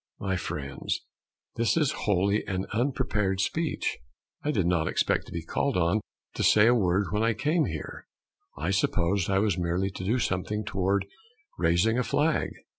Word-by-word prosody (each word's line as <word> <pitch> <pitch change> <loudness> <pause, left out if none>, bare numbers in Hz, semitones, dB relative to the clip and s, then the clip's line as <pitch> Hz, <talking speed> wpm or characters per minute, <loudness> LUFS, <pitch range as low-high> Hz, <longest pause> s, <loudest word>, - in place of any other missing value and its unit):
My 95 -1 -1
friends, 70 -6 -3 0.6
this 115 +6 +2
is 150 -5 +3
wholly 100 +1 +1
an 95 -1 -2
unprepared 115 -6 0
speech. 160 - -1 0.4
I 150 - -2
did 105 - +1
not 85 -2 +1
expect - - 0
to - - -11
be 85 -1 -4
called 140 +7 0
on 90 +5 +2 0.3
to - - -4
say 105 0 +6
a 120 - +6
word 95 -4 +1
when 105 +1 0
I 115 0 +2
came 150 - +1
here. 80 - -6 0.5
I 80 +6 -1
supposed 95 -1 +1
I 95 - +2
was 100 -2 +1
merely 90 +3 0
to 95 - -7
do 110 +7 +1
something 105 0 -1
toward 100 0 0 0.5
raising 85 +8 +3
a - - +2
flag. 155 +5 +1
100 Hz, 170 wpm, -27 LUFS, 90-115 Hz, 0.6 s, say